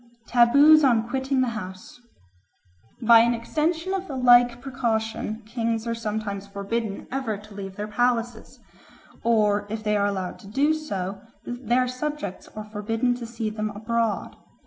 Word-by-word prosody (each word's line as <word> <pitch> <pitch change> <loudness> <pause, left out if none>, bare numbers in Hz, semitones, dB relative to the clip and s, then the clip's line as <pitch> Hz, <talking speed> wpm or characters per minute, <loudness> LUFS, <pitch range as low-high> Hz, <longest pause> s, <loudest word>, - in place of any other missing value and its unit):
4. - - -20 0.2
Taboos 300 +5 +7
on 230 -4 +3
Quitting 265 +1 0
the 255 - +1
House 190 +1 -8 1.0
BY 230 0 +8
AN 235 +1 +4
EXTENSION 320 +9 -1
of 385 0 -3
the 275 - -5
like 245 -1 +5
precaution 225 -4 -2
kings 225 0 -2
are 230 - -1
sometimes 210 -3 -4
forbidden 200 +1 -4
ever 255 -6 -2
to 210 +1 -14
leave 195 -1 -7
their 210 +1 -4
palaces; 240 +1 -1 0.6
or, 210 -3 +2
if 220 +1 -4
they 210 -1 +1
are 200 0 +2
allowed 190 -3 -3
to - - -14
do 280 +9 +2
so, 195 -11 -4 0.2
their 245 +1 0
subjects 275 -4 -5
are 215 0 -6
forbidden 225 +3 -1
to 240 -1 -6
see 225 -2 -4
them 215 0 -3
abroad. 225 +1 -2
230 Hz, 155 wpm, -25 LUFS, 210-250 Hz, 1.0 s, BY